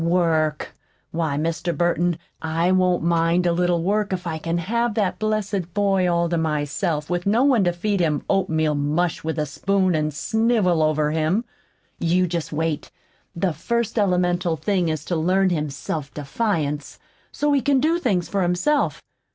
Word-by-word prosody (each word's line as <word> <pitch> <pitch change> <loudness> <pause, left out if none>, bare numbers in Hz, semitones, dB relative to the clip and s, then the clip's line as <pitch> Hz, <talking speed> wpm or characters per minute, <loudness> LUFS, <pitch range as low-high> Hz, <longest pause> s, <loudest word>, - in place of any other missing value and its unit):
"Work! 165 -3 +1 0.4
Why, 160 -4 -1
Mr. 165 +2 -2
Burton, 175 -1 +1 0.2
I 165 +3 0
won't 185 -2 +2
mind 170 +1 +2
a 175 - +3
little 175 -1 +1
work 205 +2 0
if 180 -1 -3
I 160 -2 -3
can 165 +2 -2
have 235 +6 -1
that 200 -4 0
blessed 205 -4 -2
boy 195 -3 +2
all 170 0 +1
to 170 -1 0
myself 150 +1 -1
with 175 +1 -2
no 225 +5 +3
one 260 -7 +4
to 175 - +3
feed 195 +3 -1
him 155 -4 0
oatmeal 160 -6 +1
mush 150 +4 -1
with 160 0 -3
a 150 - 0
spoon, 185 +5 0
an' 155 -1 0
snivel 205 - +1
over 155 -1 +1
him. 160 +9 0 0.5
You 175 +2 +2
jest 170 -2 -3
wait. 160 -1 -2 0.5
The 180 0 0
first 235 +7 -1
elemental 180 -3 +1
thing 185 -2 0
is 155 -1 -3
to 175 - -2
learn 185 +4 +2
him 150 -3 -1
self 140 +1 -5
defiance, 150 -2 -2 0.3
so 295 0 0
he 280 - +3
can 275 +1 +2
do 325 +5 +2
things 195 - 0
for 200 - -1
himself. 180 +12 +1
175 Hz, 170 wpm, -22 LUFS, 160-195 Hz, 0.5 s, one